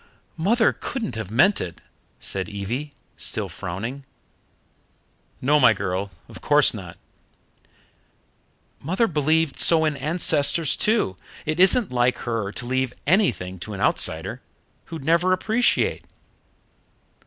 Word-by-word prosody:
"Mother 220 +8 +2
couldn't 235 -6 -5
have 110 -4 -5
meant 190 - +3
it," 85 -2 -6 0.4
said 95 0 -1
Evie, 115 +9 -5 0.3
still - - -3
frowning. 115 +11 -6 1.4
"No, 150 +3 +3
my 125 -4 +6
girl, 95 0 -3 0.2
of - - -12
course - - +4
not." - - -9 1.8
"Mother 185 - 0
believed 155 -3 0
so 160 -1 +5
in 155 -1 0
ancestors 155 0 +2
too 210 - +1 0.3
it 155 +2 -2
isn't 195 +4 +4
like 125 0 +2
her 115 -4 -2
to 120 - -7
leave 130 0 -1
anything 115 - +1
to 105 +4 -7
an - - -8
outsider, - - 0 0.4
who'd 160 -4 -8
never 170 +3 +3
appreciate. 225 +6 +1
140 Hz, 120 wpm, -23 LUFS, 110-175 Hz, 1.8 s, my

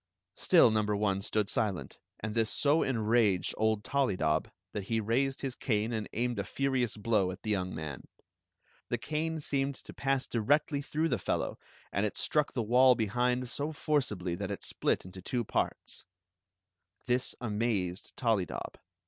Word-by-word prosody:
Still - - +5
number 105 -1 +1
one 100 -2 +1
stood 105 0 0
silent, 100 -3 -2 0.2
and 110 0 -3
this 115 -1 +2
so 145 +3 +3
enraged 110 -5 +2
old 110 -1 +1
Tollydob 90 - +1 0.2
that 100 -2 -4
he 115 +2 0
raised 130 +5 0
his 135 -2 -2
cane 115 -3 0
and 110 -2 -3
aimed 120 -1 -1
a - - 0
furious 130 -4 0
blow 105 -3 +2
at 90 0 -7
the 110 - -1
young 95 -2 -1
man. 75 -4 -6 0.8
The - - +1
cane 160 +1 -2
seemed 140 -1 -1
to - - -12
pass 135 -1 0
directly 140 +5 +1
through 155 +3 -1
the 125 - +1
fdlow, 90 - -2 0.3
and 100 - 0
it 105 - -1
stlW^ 150 -1 +1
the 120 - 0
wall 125 +3 +6
behind 125 +3 0
so 145 +5 -3
forcibly 130 - -1
that 95 +3 -3
it 100 - -5
split - - 0
into 95 0 -10
two 120 +6 -1
parts. - - -2 1.0
This 125 +1 0
amazed 105 -5 -2
Tollydob. 110 -8 -1
115 Hz, 160 wpm, -31 LUFS, 100-130 Hz, 1.0 s, wall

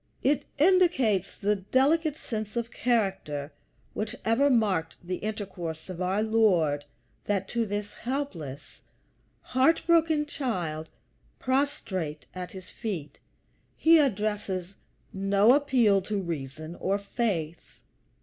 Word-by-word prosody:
It 285 +2 +2
indicates 290 - +3
the 205 +1 +1
delicate 280 - +2
sense 215 -7 -5
of 235 0 -2
character 190 - -1 0.4
which 210 0 -3
ever 240 +6 +4
marked 200 -10 +1
the 180 +1 -3
intercourse 185 -6 -5
of 180 0 -6
our 190 +4 +1
Lord, 180 -10 +2 0.4
that 195 -2 0
to 230 -2 0
this 205 0 -4
helpless, 205 - -5 0.6
heart 265 +6 +2
broken 325 -3 +3
child 175 - -3 0.5
prostrate 225 - -1
at 180 -1 -5
his 185 -1 -10
feet 165 -10 -5 0.6
he 325 0 +6
addresses 205 - -1 0.4
no 195 +4 +4
appeal 250 -8 +4
to 205 +2 -2
reason 155 -2 -5
or 195 +1 0
faith. 200 -6 -3
205 Hz, 110 wpm, -28 LUFS, 180-255 Hz, 0.6 s, he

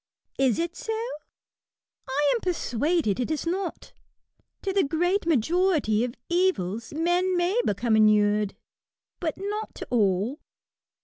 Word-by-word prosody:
Is 265 -4 +3
it 340 +1 -2
so? 445 0 -3 1.1
I 285 +2 +2
am 470 - -1
persuaded 305 - 0
it 250 - -1
is 315 0 -2
not. 360 +1 -3 0.7
To 390 - -1
the 390 - +3
great 350 +6 0
majority 310 - +2
of 245 -1 -3
evils 235 - 0
men 350 +4 +1
may 355 +6 +1
become 220 +3 +1
inured; 210 -1 +3 0.6
but 320 -4 -2
not 415 +3 -4
to - - -6
all. 215 - +1
315 Hz, 125 wpm, -26 LUFS, 225-360 Hz, 1.1 s, Is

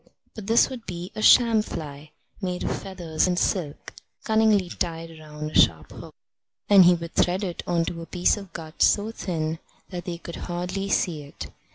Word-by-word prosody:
But 215 -3 -9
this 230 +1 +5
would 240 -3 -8
be 175 0 -6
a 215 - -5
sham 230 -1 +6
fly, 150 -6 -7 0.3
made 180 -2 -3
of - - -1
feathers 175 -4 -2
and 180 -1 0
silk, 160 -6 -2 0.3
cunningly 220 -3 +3
tied 165 -1 -5
round 150 0 -7
a - - -15
sharp 80 -2 +3
hook, - - -11 0.5
and 195 -3 +8
he 175 0 +6
would 170 0 -7
thread 185 +3 +1
it 180 -3 -4
on 170 -1 +1
to 170 0 -5
a 165 - -9
piece 180 -1 +2
of 200 -4 -10
gut 160 -1 -9
so 210 +2 +3
thin 160 -6 -3 0.3
that 175 -1 -6
they 175 -2 -4
could 170 0 -9
hardly 180 +3 -4
see 165 -5 0
it. 145 0 -9
175 Hz, 190 wpm, -25 LUFS, 165-195 Hz, 0.5 s, and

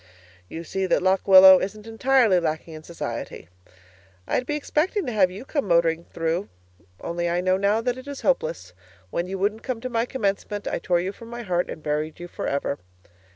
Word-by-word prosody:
You 165 - -6
see 190 +3 -2
that 185 - +2
Lock 190 +1 +2
Willow 190 -1 +10
isn't 210 +2 -5
entirely 225 -3 +3
lacking 160 0 -3
in 155 - -9
society. 160 - -6 0.8
I'd 250 - -1
be 295 - -1
expecting 315 +6 0
to 250 - -2
have 200 -5 +3
you 195 +8 -9
come 285 -5 -2
motoring 170 -1 +2
through 165 +3 -2 0.5
only 170 0 -2
I 175 +1 0
know 185 +1 +2
now 200 +3 +1
that 245 +1 0
that 255 +2 -11
is 285 -1 -6
hopeless. 155 - -1 0.4
When 175 - -2
you 195 +1 -4
wouldn't 205 +3 -1
come 255 -4 -4
to 255 - -4
my 230 0 0
commencement, 205 -3 -2
I - - -1
tore 175 0 +1
you 185 +2 -3
from 230 +3 -13
my 240 0 -6
heart 180 -3 -1
and 155 - -8
buried 150 +2 -2
you 175 - -7
for - - -5
ever. 140 0 -2
190 Hz, 200 wpm, -24 LUFS, 170-230 Hz, 0.8 s, Willow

